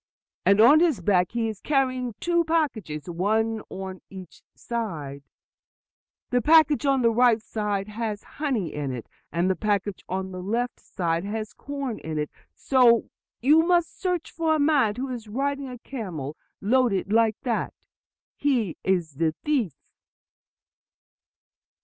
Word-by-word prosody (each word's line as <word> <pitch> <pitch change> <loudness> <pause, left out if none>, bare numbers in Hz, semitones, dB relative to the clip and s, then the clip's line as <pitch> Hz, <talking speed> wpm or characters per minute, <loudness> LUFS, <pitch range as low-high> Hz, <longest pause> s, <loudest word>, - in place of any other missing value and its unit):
And 200 +1 +5
on 275 +8 +8
his 320 - +3
back 180 0 +2
he 230 -1 0
is 215 -3 -6
carrying 255 -5 0
two 345 -1 +2
packages, 230 - -1
one 215 +6 0
on 190 -1 -7
each 190 -2 -11
side; 160 -13 -4 1.1
the 245 0 +3
package 305 0 +5
on 270 -2 +3
the 230 - +5
right 235 -1 +4
side 210 -3 -3
has 215 -1 -4 0.2
honey 250 - -1
in 145 -2 -3
it, 120 -3 -6 0.3
and 170 +2 +1
the 190 - +2
package 205 -2 -1
on 190 0 -3
the 185 0 -6
left 230 +6 -2
side 170 -3 -2
has 215 +1 -4
corn 280 -5 -5
in 160 -1 -5
it. 150 0 -2 0.2
So 235 - +4 0.3
you 300 +6 +6
must 345 0 +1
search 360 -4 -1
for 320 -1 +1
a - - 0
man 285 -8 +3
who 260 +3 -4
is 240 -3 -6
riding 275 +5 -2
a 250 - -7
camel 180 - -6 0.3
loaded 210 -3 +2
like 225 -1 +3
that. 240 -4 -1 0.6
He 245 - 0
is 180 -4 +1
the 160 -1 +1
thief." 250 - 0
225 Hz, 145 wpm, -25 LUFS, 190-270 Hz, 1.1 s, on